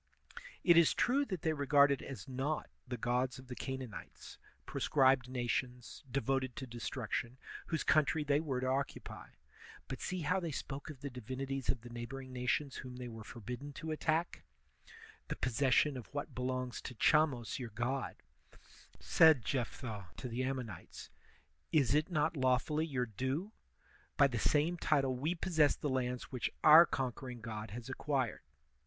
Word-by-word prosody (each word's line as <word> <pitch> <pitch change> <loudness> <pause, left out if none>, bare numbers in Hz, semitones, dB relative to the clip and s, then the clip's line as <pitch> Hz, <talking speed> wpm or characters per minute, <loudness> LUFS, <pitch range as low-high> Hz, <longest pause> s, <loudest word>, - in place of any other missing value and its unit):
It 170 -2 +6
is 170 -2 +6
true 275 +4 +2
that 185 - -5
they 160 - +2
regarded 140 -1 +4
as 135 +1 -8
naught 135 +4 -2 0.2
the 125 0 -4
gods 125 +2 0
of 130 0 -13
the 125 - -5
Canaan 130 -4 -5
ites, - - -10 0.3
proscribed 130 -3 +3
nations, 125 -1 -3
devoted 135 0 0
to 135 - -5
destruction, 120 0 -4 0.3
whose 160 - -1
country 155 0 +3
they 145 0 +2
were 140 -5 -2
to - - -1
occupy; 135 +2 -3 0.6
but 135 - -5
see 185 -1 -2
how 180 +4 +1
they 170 -2 -3
spoke 140 +1 -5
of 140 -4 -9
the 140 - -5
divinities 130 +2 -4
of 120 - +2
the 120 - -10
neighboring 130 +2 -7
nations 125 +3 -1
whom 125 -1 -7
they 125 0 -6
were 115 -2 -8
forbidden 125 +6 -7
to 160 +3 -5
attack: 160 +2 0 0.9
^The - - -4
possession 135 +3 +3
of 125 -4 -7
what 145 0 -4
belongs 125 0 -2
to 130 - -7
Chamos 140 -3 +2
your 120 -3 -5
god, 120 +5 -3 0.4
* - - -21 0.2
said 155 -8 +5
Jephthah 115 -6 -3
to - - -5
the 120 +1 -3
Ammonites, 130 -8 -5 0.3
* 70 0 -41
is 140 -5 +4
it 150 +3 +2
not 155 -1 +1
lawfully 135 +4 +1
your 130 -5 -1
due? 130 - -3 0.7
By 140 - +7
the 125 -4 0
same 155 +7 +2
title 135 -5 +2
we 155 +8 -1
pos. 170 0 -4
sess 150 -2 +6
the 145 - -3
lands 125 -1 -2
which 125 -3 -1
our 160 +2 +10
conquering 125 -1 -3
god 110 -1 -5
has 120 +4 -7
acquired. 130 -2 -1
130 Hz, 165 wpm, -35 LUFS, 125-150 Hz, 0.9 s, our